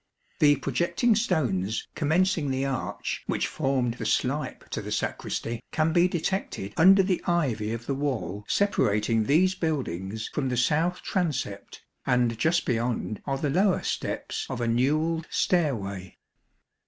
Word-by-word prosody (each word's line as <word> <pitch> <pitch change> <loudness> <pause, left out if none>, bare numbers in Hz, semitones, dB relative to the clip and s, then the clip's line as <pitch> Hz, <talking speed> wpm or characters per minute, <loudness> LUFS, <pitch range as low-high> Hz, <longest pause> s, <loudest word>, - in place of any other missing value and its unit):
The 145 -1 +6
projecting 170 - +1
stones, 120 - 0
commencing 160 0 +1
the 135 +1 0
arch 135 -2 -3
which - - 0
formed 135 -5 0
the - - -3
slype 145 +4 -1
to - - -3
the - - -7
sacristy, 115 0 -3
can 155 0 +1
be 175 +1 +5
detected 175 - -3
under 190 +3 +7
the 185 -1 0
ivy 130 -12 0
of 115 +1 -5
the 140 - -1
wall 135 -7 -2
separating 115 - +2
these 180 - +4
buildings 110 - -3
from 135 -3 -1
the 125 - -1
south 160 +8 +1
transept, 135 - -3 0.2
and 125 -2 +2
just 165 +6 +2
beyond 115 -2 -1
are 135 -1 0
the 145 0 -1
lower 190 +4 +2
steps - - -3
of 130 - -4
a 120 - 0
newelled 155 +7 +1
stairway. 100 - -1
140 Hz, 140 wpm, -27 LUFS, 115-170 Hz, 0.2 s, under